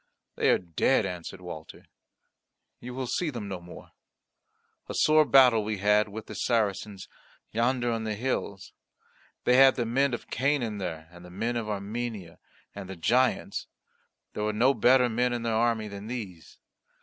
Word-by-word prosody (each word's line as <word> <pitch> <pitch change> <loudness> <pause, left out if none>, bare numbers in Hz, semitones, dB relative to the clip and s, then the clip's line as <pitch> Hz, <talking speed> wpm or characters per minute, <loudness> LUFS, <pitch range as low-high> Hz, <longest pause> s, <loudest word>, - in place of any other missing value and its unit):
"They - - +2
are - - +5
dead," 90 +7 +1
answered 90 +1 -6
Walter; 80 -3 -10 0.9
"you 125 0 -8
will 130 0 -3
see 155 +7 -1
them 120 -7 -6
no 95 -3 -6
more. 85 0 -13 1.0
A - - -4
sore 155 0 +5
battle 125 -4 +6
we 105 0 -3
had 105 +2 +3
with 110 +1 -8
the - - -9
Saracens 105 -3 -1 0.4
yonder 120 +1 +1
on 115 -1 -2
the 110 -1 -2
hills; 100 -4 -3 0.7
they 125 - +4
had 135 0 +7
the 120 - -1
men 130 +3 +1
of - - -12
Canaan 125 -6 0
there 80 -4 -5
and 90 0 -14
the 90 - -12
men 110 +7 -3
of 115 -2 -3
Armenia 105 -3 -5 0.3
and 100 -2 -8
the 95 - -6
Giants; 125 +9 +1 0.7
there 105 - -3
were 105 - -1
no 125 +6 +3
better 125 -1 +4
men 120 +1 0
in 120 -1 -3
their 115 -1 -1
army 115 -1 +1
than 100 0 -8
these. 100 - -7
110 Hz, 170 wpm, -27 LUFS, 100-125 Hz, 1.0 s, had